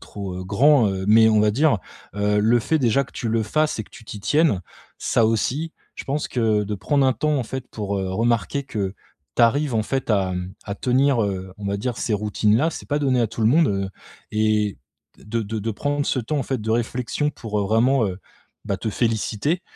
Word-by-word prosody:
trop, 100 -3 -7
heu, 95 - -6
grand, 120 +5 +4
heu, 95 0 -3
mais 110 +1 +7
on 110 -1 +4
va 105 0 +4
dire, 135 0 +3 0.4
heu, 105 0 +1
le 115 +3 +4
fait 155 +6 +1
déjà 130 +1 +2
que - - -19
tu 115 - -4
le 115 0 +1
fasses 155 +5 0
et 110 - -3
que - - -24
tu 115 - -14
t'y 105 -1 -8
tiennes, 125 - +2 0.4
ça 115 - +2
aussi 135 +9 -1 0.2
je - - -7
pense 145 +2 -2
que 110 -4 +1
de 105 +1 -3
prendre 135 +9 +1
un 130 - +3
temps 150 +6 0
en 130 - 0
fait 130 +2 -6
pour, 100 -2 -3
heu, 95 - -2
remarquer 115 +3 0
que 100 -6 -3 0.4
tu 120 - +4
arrives 135 +2 +3
en 110 - +2
fait 130 +2 -2
à, 95 -3 +2
mmh, 90 +1 -4
à 100 - -4
tenir, 130 +1 +2
heu, 95 -1 -4
on 105 - -8
va 100 - -1
dire 120 +2 -3
ces 110 - 0
routines 105 +1 +1
là, 160 +6 +2
c'est - - -8
pas 145 0 +1
donné 130 -3 +2
à 115 - +3
tout 110 - -8
le 110 - +4
monde, 160 +4 +4
heu 100 -1 -1 0.4
et 105 -3 +1 0.4
de 115 +2 -3
de 110 +2 -4
de 115 - -2
prendre 145 +5 -1
ce 130 - +1
temps 145 +6 -2
en 135 - 0
fait 130 +1 -2
de 110 - -3
réflexion 120 +5 -1
pour 110 -6 -4
vraiment, 115 +2 +3
heu, 95 0 -4 0.5
bah, 100 - -1
te 110 - -3
féliciter, 115 - 0
110 Hz, 230 wpm, -23 LUFS, 105-135 Hz, 0.5 s, mais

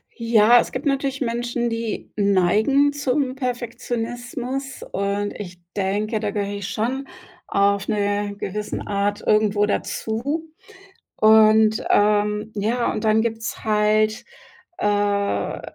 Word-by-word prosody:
Ja, 230 0 +5
es - - -2
gibt 260 +4 -5
natürlich 275 -1 -1
Menschen, 240 0 -1
die 230 -1 -4
neigen 210 +8 +3
zum 270 -2 -1
Perfektionismus, 245 +1 -4
und 200 +1 -2
ich 175 -3 -8 0.2
denke, 210 +3 -1
da 210 -2 -2
gehöre 205 0 -3
ich 200 - -5
schon 255 +6 -2 0.4
auf 200 0 +1
'ne 205 -1 -1
gewissen 210 +2 -4
Art 205 +1 -1
irgendwo 210 -1 +3
dazu. 275 +10 -3 0.7
Und, 220 0 +5
ähm 210 +1 +2
ja, 225 +4 0
und 215 - -4
dann 220 0 +3
gibt's 225 0 -4
halt, 215 0 +2 0.5
äh, 205 -1 0
215 Hz, 115 wpm, -22 LUFS, 205-240 Hz, 0.7 s, Ja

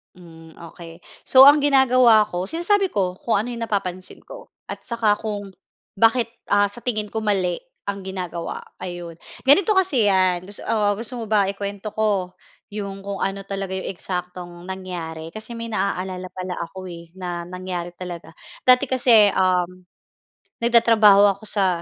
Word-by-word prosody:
Hmm, 165 -2 -15
okey. 165 0 -12 0.2
So 260 - +6
ang 285 +2 +9
ginagawa 255 -5 +5
ko, 180 +1 -3
sinasabi 375 - 0
ko 185 -3 -1
kung 235 - -2
ano 235 - -6
'yong 235 -1 -4
napapansin 185 -3 -4
ko. - - -12 0.2
At - - -8
saka 225 -3 +1
kung 205 -2 -5 0.5
bakit, 230 +3 +3 0.2
ah, 205 0 +4
sa 235 +4 -12
tingin 215 -4 -2
ko 220 - -6
mali 195 -5 0 0.3
ang 200 -1 -5
ginagawa, 180 -3 -5 0.2
ayun. 175 -2 -7 0.2
Ganito 335 +10 +5
kasi 360 - +2
'yan, 185 -2 +2
gus 205 +1 -11
oo, 210 -2 0
gusto 235 +4 -6
mo 230 - -5
ba 205 -2 +2
ikuwento 200 +1 -5
ko, 205 -4 +1 0.4
'yong 200 -2 -6
kung 200 0 -3
ano 195 0 -3
talaga 195 -1 -5
'yong 190 - -4
eksaktong 180 -1 -6
nangyari? 165 -4 -6
Kasi 220 +2 -7
may 230 -1 -6
naaalala 185 -2 -3
pala 185 -1 -6
ako, 185 +3 -8
eh, 170 0 -12
na 175 -2 -4
nangyari 180 -1 -5
talaga. 175 -2 -8 0.3
Dati 255 +2 +5
kasi, 240 -6 +4
uhm, 185 -1 0 0.8
nagtatrabaho 215 -4 +5
ako - - -19
sa 185 -4 +1
195 Hz, 155 wpm, -22 LUFS, 180-225 Hz, 0.8 s, ang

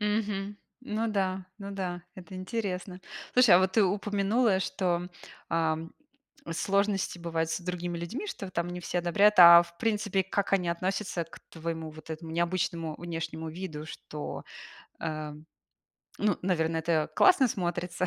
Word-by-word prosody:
Мгм. 210 -1 -1 0.2
Ну 225 -3 -2
да, 190 -3 -1
ну 200 -1 -7
да, 180 -3 -4
это 185 +1 -11
интересно. 185 -2 -4 0.3
Слушай, 245 -7 +7
а - - +8
вот 190 0 +2
ты 215 0 +5
упомянула, 205 +2 +1
что, 180 -2 -1 0.4
ам, 165 0 0 0.6
сложности 195 +1 0
бывают 165 -1 -1
с 165 - -2
другими 175 -1 -4
людьми, 230 - -5
что 195 - -6
там 170 -1 -1
не 180 0 -5
все 175 - -2
одобряют. 200 +5 +4
А 170 -1 +11
в 170 0 -15
принципе, 210 -3 0
как 195 +1 -1
они 180 -3 +2
относятся 185 +1 -1
к 165 - -14
твоему 160 -1 -5
вот 155 +1 -12
этому 160 +1 -6
необычному 170 -2 -1
внешнему 165 -1 -5
виду, 160 -2 -6
что, 150 -1 -7 0.6
эм, 155 -1 -5 0.7
ну, 205 -3 +1
наверно, 165 -3 0
это 160 -1 0
классно 295 -9 +6
смотрится, 180 -2 -2
180 Hz, 145 wpm, -29 LUFS, 165-200 Hz, 0.7 s, А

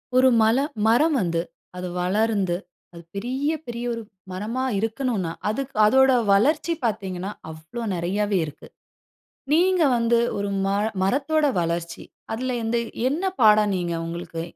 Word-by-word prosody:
ஒரு 260 0 +6
மல 220 +2 +4 0.3
மரம் 295 +8 +4
வந்து, 170 -2 0 0.4
அது 180 0 -4
வளர்ந்து 200 -1 +1 0.4
அது 170 - -10
பெரிய, 255 +8 -2 0.2
பெரிய 240 0 -5
ஒரு 230 - -5 0.3
மரமா 215 +8 -3 0.2
இருக்கனுன்னா, 225 -5 -1 0.2
அதுக்கு 270 +4 -4
அதோட 265 +4 +5 0.2
வளர்ச்சி 295 +11 +3
பாத்தீங்கன்னா, 195 -3 -3 0.2
அவ்ளோ 160 +9 -8
நெறயாவே 195 +4 0
இருக்கு. 150 - -11 0.9
நீங்க 360 +2 +4
வந்து 235 0 +2 0.2
ஒரு 200 0 -2 0.2
மர 200 +1 +1 0.2
மரத்தோட 280 +10 +1 0.2
வளர்ச்சி, 170 0 -3 0.3
அதில 255 +2 -2
எந்த 230 +1 0 0.3
என்ன 300 +7 -2 0.2
பாடம் 210 -1 +5
நீங்க 175 -1 -2
உங்களுக்கு 165 -1 -5
215 Hz, 130 wpm, -24 LUFS, 185-255 Hz, 0.9 s, ஒரு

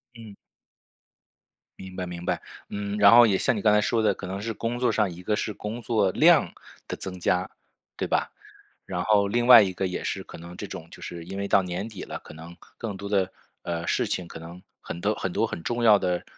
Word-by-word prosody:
嗯。 110 -3 -11 1.4
明 95 -1 -10
白 90 -1 -3
明 85 0 -7
白。 - - -1 0.3
嗯， 100 0 -4
然 105 +2 +7
后 120 - +9
也 100 -4 +2
像 - - +1
你 105 - -3
刚 105 0 +4
才 105 - +5
说 115 +2 +1
的， 110 - +3
可 - - -9
能 95 +1 -5
是 115 +1 -3
工 115 +3 -3
作 125 -2 +2
上 105 -3 +1
一 85 +1 -10
个 105 - 0
是 105 0 -3
工 105 +4 -6
作 110 -4 +1
量 - - +4 0.3
的 - - -5
增 90 -1 -6
加， 90 +1 0 0.5
对 - - -3
吧？ - - 0 0.5
然 90 -2 -3
后 100 -2 +3
另 120 +3 0
外 125 - +11
一 95 -2 +1
个 95 - -2
也 90 - -4
是 - - -3
可 - - -11
能 85 +1 -11
这 - - -5
种 80 - -8
就 - - -13
是 85 -1 -7
因 95 +3 -7
为 100 - -2
到 100 - +4
年 90 +3 -4
底 105 -4 -8
了， - - -6
可 - - -13
能 80 +2 -11 0.2
更 105 -4 -5
多 100 - -7
的， 95 -2 +1 0.3
呃， 85 -1 -4
事 - - 0
情， 90 -2 -3
可 80 - -9
能 85 +2 -10 0.2
很 85 - -7
多 105 +3 +1
很 95 - -3
多 115 - +1
很 85 - -6
重 120 +6 -2
要 105 -3 +7
的， 90 -1 -1
100 Hz, 255 characters per minute, -26 LUFS, 90-110 Hz, 1.4 s, 外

